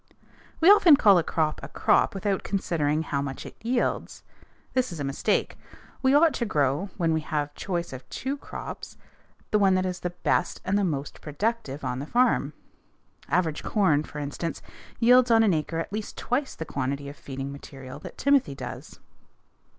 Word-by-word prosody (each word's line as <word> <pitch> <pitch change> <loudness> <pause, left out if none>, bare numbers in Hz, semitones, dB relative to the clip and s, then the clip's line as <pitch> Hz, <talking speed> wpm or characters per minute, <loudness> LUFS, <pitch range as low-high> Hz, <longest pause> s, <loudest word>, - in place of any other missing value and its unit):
_ - - -35 0.5
We 345 +5 +8
often 355 -7 +8
call 200 -7 +6
a - - 0
crop 155 -2 -1
a 140 - -7
crop 145 - +2
without 195 0 -1
considering 160 -6 0
how 140 -3 -2
much 135 -1 -5
it - - -10
yields. 240 +2 -1 0.5
This 255 -5 +1
is 170 - -7
a - - -2
mistake. 135 0 -1 0.4
We 265 +1 +4
ought 315 +1 +5
to - - -2
grow, 145 +4 0
when 165 -3 +1
we 160 - 0
have 150 -2 -2
choice 175 -2 -3
of 130 0 -10
two 270 +2 -3
crops, 285 - -8 0.5
the 210 - +3
one 195 -2 +4
that 185 0 +1
is 180 -1 -3
the 180 - -2
best 175 0 -1
and 190 - +1
the 205 - +2
most 145 -6 -3
productive 155 - -3
on 125 0 -2
the 140 - -5
farm. 235 - +2 0.8
Average 165 -3 +1
corn, 185 -9 +2
for 150 - -9
instance, 150 +3 -4 0.4
yields 250 +1 +6
on 225 -1 +6
an 205 -4 +3
acre 160 +1 -2
at 165 +4 -4
least 215 0 -5
twice 265 +3 -1
the 160 - -5
quantity 140 0 -3
of 140 - -8
feeding 135 -1 -6
material 135 -2 -10
that - - -10
timothy 275 - +2
does. - - -8
170 Hz, 185 wpm, -26 LUFS, 145-220 Hz, 0.8 s, We